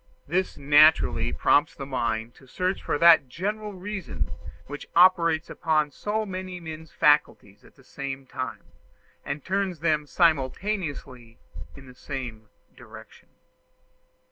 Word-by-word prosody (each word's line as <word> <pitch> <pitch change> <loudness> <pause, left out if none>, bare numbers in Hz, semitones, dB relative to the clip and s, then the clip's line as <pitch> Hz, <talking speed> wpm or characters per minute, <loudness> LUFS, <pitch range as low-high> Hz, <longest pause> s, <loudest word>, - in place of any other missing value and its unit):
This 180 +5 -1
naturally 150 +3 +4
prompts 145 +2 +2
the 135 - -7
mind 120 -3 -2
to 135 - -20
search 185 +7 -2
for - - -1
that 165 -4 +6
general 210 +7 -4
reason 195 -1 -5 0.3
which 145 +1 -8
operates 170 -2 +4
upon 155 -2 0
so 215 +8 -3
many 185 -2 -6
men's 160 -1 -9
faculties 125 -9 +1
at - - -20
the 135 - -21
same 135 0 -7
time, 130 0 -6 0.6
and 140 0 -5
turns 190 -3 -1
them 155 -3 +1
simultaneously 145 - -1 0.4
in 140 - -13
the 125 - -13
same 125 -5 -7 0.3
direction. - - -15
155 Hz, 125 wpm, -25 LUFS, 135-185 Hz, 0.6 s, that